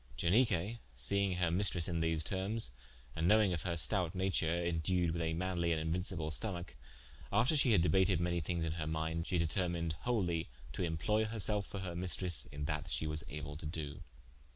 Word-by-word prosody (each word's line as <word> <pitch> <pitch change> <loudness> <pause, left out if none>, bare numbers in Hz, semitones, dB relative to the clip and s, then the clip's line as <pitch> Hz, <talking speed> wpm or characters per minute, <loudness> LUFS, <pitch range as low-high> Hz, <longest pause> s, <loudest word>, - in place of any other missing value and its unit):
Ianique 105 +2 +2 0.2
seing 100 +8 +1
her 90 -2 +1
maistresse 90 -2 +2
in 85 -2 -1
these 80 -1 +2
termes, 95 - +1 0.4
and 80 +1 +1
knowinge 105 -5 +4
her 85 +1 -2
stoute 90 +3 +1
nature, 95 -3 +1
indued 85 +1 +1
with 85 +1 -2
a 80 0 0
manly 85 -1 0
and 80 - +1
inuincible 80 0 -1
stomacke, 85 +1 -3 0.6
after 115 +10 +3
shee 135 -5 +4
had 85 -5 +5
debated 90 -1 +3
manye 85 0 0
thinges 85 +1 -1
in 80 - -1
her 80 -1 -3
minde, 80 +1 -2
she 90 - +1
determined 85 -1 0
wholie 90 -9 0 0.3
to 75 - -3
imploye 90 +6 +1
herselfe 105 -2 0
for 100 - -6
her 90 -2 -4
maistres 90 -4 +1
in 70 0 -4
that 75 -1 -3
shee - - -1
was 75 -1 -2
able 75 +1 -5
to 75 0 -6
doe. 75 -2 -5
85 Hz, 180 wpm, -35 LUFS, 80-95 Hz, 0.6 s, had